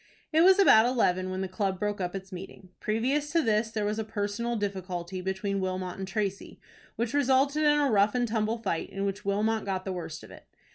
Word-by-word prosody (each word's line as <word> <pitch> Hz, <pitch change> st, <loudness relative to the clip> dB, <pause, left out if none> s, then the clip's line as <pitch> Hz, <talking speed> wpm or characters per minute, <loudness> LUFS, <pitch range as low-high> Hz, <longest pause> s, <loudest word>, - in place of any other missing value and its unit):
It 320 Hz, -, +5 dB
was 380 Hz, +2 st, +7 dB
about 235 Hz, -, +7 dB
eleven 185 Hz, -7 st, +1 dB
when 185 Hz, 0 st, -3 dB
the 190 Hz, -, -2 dB
club 190 Hz, 0 st, -2 dB
broke 205 Hz, -1 st, -2 dB
up 180 Hz, +1 st, -3 dB
its 195 Hz, +1 st, -7 dB
meeting. 185 Hz, 0 st, -9 dB
Previous 265 Hz, +7 st, 0 dB
to 335 Hz, -1 st, +3 dB
this 220 Hz, -1 st, +1 dB
there 215 Hz, -2 st, -2 dB
was 210 Hz, +1 st, -1 dB
a -, -, -1 dB
personal 220 Hz, +2 st, -2 dB
difficulty 185 Hz, -3 st, -4 dB
between 190 Hz, +1 st, -2 dB
Wilmot 185 Hz, -1 st, -3 dB
and 190 Hz, -, -4 dB
Tracy, 200 Hz, -1 st, -3 dB, 0.4 s
which 235 Hz, +2 st, -2 dB
resulted 280 Hz, +1 st, +3 dB
in 295 Hz, -1 st, +4 dB
a 285 Hz, -3 st, +2 dB
rough 205 Hz, +2 st, +3 dB
and 245 Hz, -1 st, +1 dB
tumble 220 Hz, 0 st, 0 dB
fight, 195 Hz, -7 st, -3 dB
in 195 Hz, +1 st, -3 dB
which 200 Hz, 0 st, -4 dB
Wilmot 215 Hz, +2 st, +1 dB
got 190 Hz, -1 st, -3 dB
the 190 Hz, -, -2 dB
worst 165 Hz, -3 st, -6 dB
of -, -, -13 dB
it. -, -, -14 dB
205 Hz, 220 wpm, -28 LUFS, 190-235 Hz, 0.4 s, was